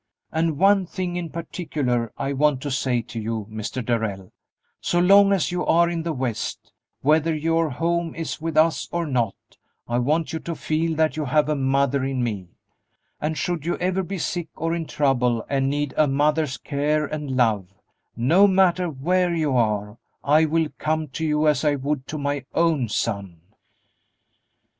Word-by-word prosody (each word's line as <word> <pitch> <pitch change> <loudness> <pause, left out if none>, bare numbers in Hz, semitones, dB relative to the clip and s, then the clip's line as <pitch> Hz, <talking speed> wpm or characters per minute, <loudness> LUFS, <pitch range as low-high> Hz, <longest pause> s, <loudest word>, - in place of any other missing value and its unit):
And 160 -2 0
one 195 +1 +4
thing 180 -1 -4
in 175 -2 -3
particular 145 - -2
I 140 0 -2
want 145 -1 +2
to 145 - -4
say 125 -2 0
to 115 0 -7
you, 110 -1 -3
Mr. 110 +3 -4
Darrell: 105 -5 -2 0.5
so 175 - 0
long 200 +3 +6
as 195 -4 +1
you 180 0 -1
are 170 +1 +3
in 170 -1 -2
the 165 0 -2
West, 125 -6 -4 0.3
whether 155 +3 +3
your 165 +1 +1
home 170 +4 -1
is 165 -1 -5
with 160 -1 -3
us 160 +1 +3
or 170 0 -1
not, 120 -8 0 0.5
I 120 +1 0
want 155 +7 0
you 160 - -2
to 170 0 -5
feel 160 +1 -1
that 155 0 +1
you 155 - -1
have 150 +2 +2
a 150 - +1
mother 140 0 +1
in 135 -2 -1
me, 105 -6 -3 0.7
and 155 +1 -2
should 170 0 -2
you 170 +2 -1
ever 185 +1 0
be 190 +1 -5
sick 175 -1 -3
or 165 +1 -2
in 165 -2 -3
trouble 125 -6 +1
and 135 -1 0
need 145 -1 -1
a 155 - +4
mother's 145 0 +1
care 150 +1 0
and 145 -3 -4
love, 105 -7 +1 0.4
no 165 - +5
matter 185 -2 +3
where 175 +5 0
you 155 -5 0
are, 105 -2 0 0.2
I 155 +3 +4
will 160 0 +1
come 155 -1 -1
to 150 +5 -5
you 155 0 +2
as 150 -2 +2
I 150 -1 +3
would 140 0 -3
to 155 - -4
my 145 -1 -2
own 160 -8 +2
son." 100 -6 -2
150 Hz, 180 wpm, -23 LUFS, 130-165 Hz, 0.7 s, long